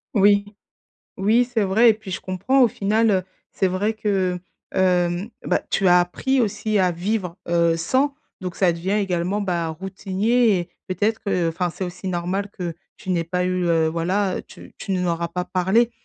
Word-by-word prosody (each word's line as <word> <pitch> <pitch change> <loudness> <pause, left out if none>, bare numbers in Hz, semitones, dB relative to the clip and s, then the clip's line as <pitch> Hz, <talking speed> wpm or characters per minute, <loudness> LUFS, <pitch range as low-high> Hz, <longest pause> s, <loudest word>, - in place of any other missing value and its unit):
Oui. 200 0 +5 0.7
Oui, 220 +5 +3
c'est 240 -3 -1
vrai 220 +5 +5
et 220 - +6
puis, 210 -3 -10
je - - -4
comprends, 225 +9 +1
au 240 - +6
final, 215 +2 +1
heu, 185 -2 +1 0.3
c'est 190 - +1
vrai 200 +4 0
que, 195 -4 0
heu, - - -31 0.4
hem, 180 +2 +1 0.2
bah, - - +2
tu 195 - +1
as 180 0 +7
appris 260 +10 0
aussi 215 -2 0
à 185 -1 +3
vivre, 185 0 -2
heu, 170 -1 +3
sans, 260 - +1 0.2
donc 180 -2 -5
ça 185 -3 +3
devient 170 +3 -3
également, 195 -1 0
bah, 175 -4 -1
routinier 195 +6 +1
et 175 0 -6 0.2
peut-être 210 +4 0
qu'enfin, 180 -2 0
c'est 175 - -5
aussi 180 +1 -6
normal 185 +3 -2
que 175 -3 -3 0.2
tu - - -10
n'aies 170 -2 +1
pas 180 +2 -1
eu, 185 0 0
heu, 165 -2 +3
voilà, 180 +4 0
tu - - -14
tu 195 - -3
ne 180 - 0
leur 170 -1 -1
as 170 - 0
pas 180 +1 -3
parlé, 195 +7 +2
185 Hz, 190 wpm, -22 LUFS, 175-210 Hz, 0.7 s, as